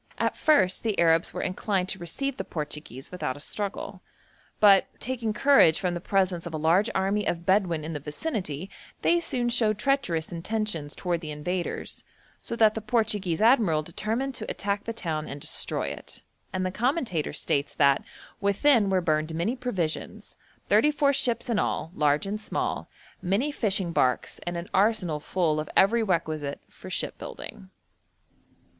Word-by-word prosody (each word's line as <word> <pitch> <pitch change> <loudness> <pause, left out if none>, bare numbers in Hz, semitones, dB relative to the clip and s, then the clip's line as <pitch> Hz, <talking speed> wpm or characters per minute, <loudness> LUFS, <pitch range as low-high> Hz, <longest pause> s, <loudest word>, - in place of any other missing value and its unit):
At - - 0
first 190 -13 +3
the 220 -3 -1
Arabs 165 0 +3
were - - -4
inclined 185 0 -1
to - - -2
receive 265 - -3
the - - -3
Portuguese 150 -3 -6
without 150 -8 -3
a - - -11
struggle; 200 +6 -3 0.6
but, 200 -2 +6
taking 240 -2 -2
courage 215 - +5
from 180 -2 -1
the 175 - -4
presence 185 -3 0
of 165 - -5
a - - -1
large 170 +8 +3
army 195 +2 +1
of 170 0 -2
Bedouin 185 -5 +2
in 165 - -4
the 150 - -3
vicinity, 160 - -4 0.4
they 345 - +4
soon 255 -7 -1
showed 225 -3 +2
treacherous 205 - 0
intentions 175 -4 -2
towards 175 -2 -1
the 155 - -6
invaders, 170 +4 -3 0.4
so - - -4
that 220 -2 +5
the 220 - -4
Portuguese 210 -6 0
admiral 215 - +4
determined 225 - -2
to - - -6
attack 200 +1 -2
the 230 - -2
town 160 -9 -3
and 140 - -6
destroy - - -1
it, - - -9 0.3
and 185 0 -2
the 185 - -1
commentator 235 - -1
states 145 -1 -1
that 140 -2 +4 0.4
'within 205 +2 +3
were 190 -1 +2
burned 155 -1 0
many 175 +10 0
provisions, 195 -11 -3 0.3
thirty 300 - +5
four 285 -1 +2
ships 240 -3 +1
in 230 -4 +1
all, 165 - -1
large 150 +3 +2
and 210 +2 -3
small, - - -3 0.3
many 205 +11 0
fishing 195 -9 +1
barks, 125 -4 +1
and 175 0 -2
an 170 +1 -5
arsenal 195 -7 +2
full 155 -1 0
of 155 - -4
every 225 +5 +5
requisite 160 -7 -1
for - - -12
ship - - -3
building.' 65 0 -8
185 Hz, 165 wpm, -27 LUFS, 160-220 Hz, 0.6 s, but